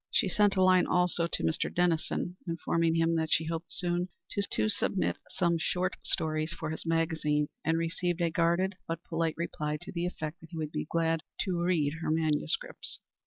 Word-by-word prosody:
She - - +2
sent 205 +1 +3
a 190 - +4
line 185 -1 +5
also 180 -1 +2
to - - -1
Mr. 160 - 0
Dennison, 175 0 0
informing 165 0 +1
him 165 0 +3
that 160 0 -1
she 160 - +3
hoped 165 +1 -4
soon 175 0 0 0.2
to 200 +1 0
submit 200 -2 0
some 170 -2 +1
short 180 +3 0
stories 155 0 0
for 165 -2 -4
his 160 - -1
magazine, 160 -3 +1
and 160 +1 +2
received 165 +1 -1
a 170 -1 +2
guarded 170 +3 +2
but 165 +1 -3
polite 165 -1 -1
reply 150 -3 -2
to - - -8
the 175 0 -1
effect 160 -1 -5
that 165 - -13
he 165 - -7
would 155 -1 -3
be - - -3
glad 165 -1 +1 0.2
to 180 -3 -1
read 165 -5 +2
her - - -1
manuscripts. 160 - 0
165 Hz, 185 wpm, -30 LUFS, 160-180 Hz, 0.2 s, line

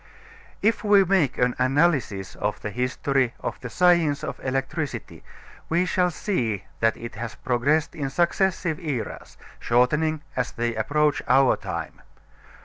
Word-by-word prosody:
If 220 +1 +2
we 205 -2 +6
make 170 -8 +2
an 125 0 +1
analysis 130 - +1
of 105 0 -3
the 105 - -3
history 125 +1 0
of - - -5
the 125 - -7
science 170 -3 +3
of - - -5
electricity 135 +3 -3 0.5
we 175 +2 +2
shall 180 0 +2
see 120 - -2 0.2
that 115 -1 +2
it 115 0 -7
has 115 0 -6
progressed 145 +6 +1
in 140 -3 -3
successive 175 0 0
eras, 145 -9 -5 0.2
shortening 150 +6 +1
as 125 - -2
they 120 0 -1
approach 145 +6 +1
our 130 +1 +5
time. - - -6
140 Hz, 140 wpm, -24 LUFS, 120-170 Hz, 0.5 s, we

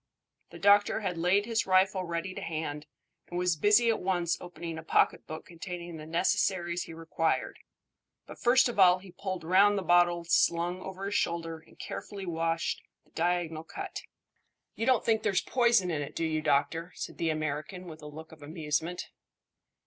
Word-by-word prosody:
The 170 - -11
doctor 205 +4 +4
had 180 -5 -2
laid 185 +4 +3
his 230 -2 0
rifle 185 0 +3
ready 170 +2 -3
to - - -7
hand, 155 -2 -4 0.4
and 175 - -4
was 180 -1 +2
busy 210 +9 +4
at 220 - -2
once 175 -2 0
opening 170 -2 -6
a - - -9
pocket - - +2
book 155 +1 -7
containing 175 -1 -7
the 155 0 -9
necessaries 175 0 0
he 165 - -9
required; 165 0 -1 0.7
but - - -11
first 250 +2 +5
of 240 -4 -4
all 180 -1 +7
he 185 0 -13
pulled 185 -2 -5
round 195 +4 +5
the 195 - -2
bottle 175 -1 +4
slung 170 +1 +2
over 190 +1 -6
his 200 - -3
shoulder 165 -3 -1
and 160 - -22
carefully 200 -2 -6
washed 165 -1 -1 0.2
the - - -30
diagonal 165 -2 -1
cut. - - -6 0.7
"You 225 - -3
don't 255 -3 +3
think 220 -1 +2
there's 195 -3 +1
poison 235 -7 +3
in 150 -3 -1
it, 140 - -7
do 165 - -1
you, 155 -1 -1
doctor?" 165 +4 +1
said - - -7
the 165 - +1
American, 155 +4 -3
with 160 -2 -10
a 150 - -9
look 155 +2 -10
of 160 -1 -15
amusement. 160 +3 -3
175 Hz, 180 wpm, -29 LUFS, 165-190 Hz, 0.7 s, all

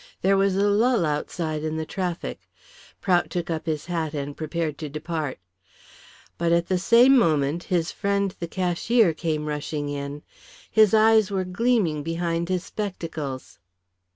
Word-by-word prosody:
There 195 +1 +4
was 195 -1 +2
a 200 +1 +2
lull 215 -1 +3
outside 155 +1 -2
in 155 0 -2
the 160 - -3
traffic. 180 0 -4 0.5
Prout 175 -4 +2
took 175 0 -3
up 160 0 -4
his 155 -2 -2
hat 165 -3 -3
and 140 0 -4
prepared 160 -1 -3
to 155 -2 -5
depart. 155 -1 -4 1.0
But 170 0 +2
the 185 -1 +1
same 240 +7 +6
moment 155 - +2
his 175 -4 0
friend, 200 -2 -1
the 170 - -4
cashier, 185 +3 +2
came 155 -2 -2
rushing 150 0 -3
in. 145 0 -5 0.5
His 215 -1 +5
eyes 220 -1 +5
were 190 -2 -1
gleaming 185 -5 +1
behind 165 +2 -2
his 185 -1 0
spectacles. 165 -10 -5
170 Hz, 150 wpm, -24 LUFS, 155-195 Hz, 1.0 s, same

